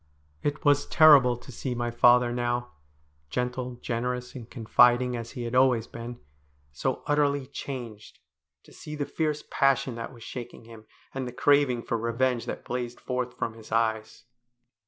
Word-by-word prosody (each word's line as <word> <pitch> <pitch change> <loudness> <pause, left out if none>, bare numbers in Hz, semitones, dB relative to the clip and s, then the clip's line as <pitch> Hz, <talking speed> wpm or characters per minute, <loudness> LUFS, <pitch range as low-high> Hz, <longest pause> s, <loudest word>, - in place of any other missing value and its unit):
It 145 +1 -3
was 145 0 +4
terrible 140 -6 +6
to 125 - -13
see 125 +1 -4
my 120 0 -2
father 120 +1 +5
now 120 0 -2 0.3
— 75 0 -39
gentle, 125 - -3
generous, 125 +1 -3
and 120 -3 -9
confiding 120 +1 +3
as 115 -1 -6
he 125 -3 -5
had 115 0 -5
always 125 -3 +4
been 115 +1 -8 0.3
— 70 0 -38
so 130 - -1
utterly 145 -2 +1
changed, 120 -6 -8 0.5
to - - -18
see 150 - -8
the 145 -1 -2
fierce 150 -1 -2
passion 135 -2 +2
that 115 - -6
was 120 -3 -13
shaking 120 -1 -8
him, 110 -1 -14 0.3
and 135 -1 -3
the - - -5
craving 135 -2 +2
for 115 - -2
revenge 120 +1 0
that - - -5
blazed 125 -1 -4
forth 125 -1 -3
from 115 - -2
his 110 -1 -14
eyes. 110 0 -1
125 Hz, 170 wpm, -27 LUFS, 115-130 Hz, 0.5 s, terrible